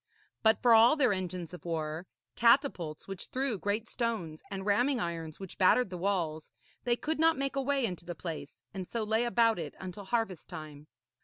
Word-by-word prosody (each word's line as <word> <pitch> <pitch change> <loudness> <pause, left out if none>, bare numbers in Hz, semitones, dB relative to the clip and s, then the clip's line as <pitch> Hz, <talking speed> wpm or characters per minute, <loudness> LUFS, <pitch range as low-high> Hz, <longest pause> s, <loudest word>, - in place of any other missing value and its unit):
But 220 0 +4
for 240 -2 +7
all 230 +5 +7
their 260 -8 +3
engines 180 -2 -4
of 180 - -9
war, 160 +1 -3 0.3
catapults 230 - +2
which 195 -2 -6
threw 260 -5 -1
great 210 +4 -1
stones, 220 -12 -3
and 195 -1 -5
ramming 245 +6 +2
irons 165 -4 -4
which 190 -2 -9
battered 190 +3 +4
the - - -4
walls, 170 -5 -1 0.4
they 240 -1 +3
could 310 +5 -3
not 325 0 +4
make 275 0 -1
a 275 - +1
way 275 -1 +1
into 180 -5 -4
the 175 0 -5
place, 165 -1 -7
and 185 -2 -5
so 230 -2 -2
lay 220 +2 +1
about 230 -4 +3
it 155 -4 -5
until 190 +2 -7
harvest 225 -5 -2
time. 155 -3 -9
200 Hz, 190 wpm, -31 LUFS, 170-235 Hz, 0.4 s, for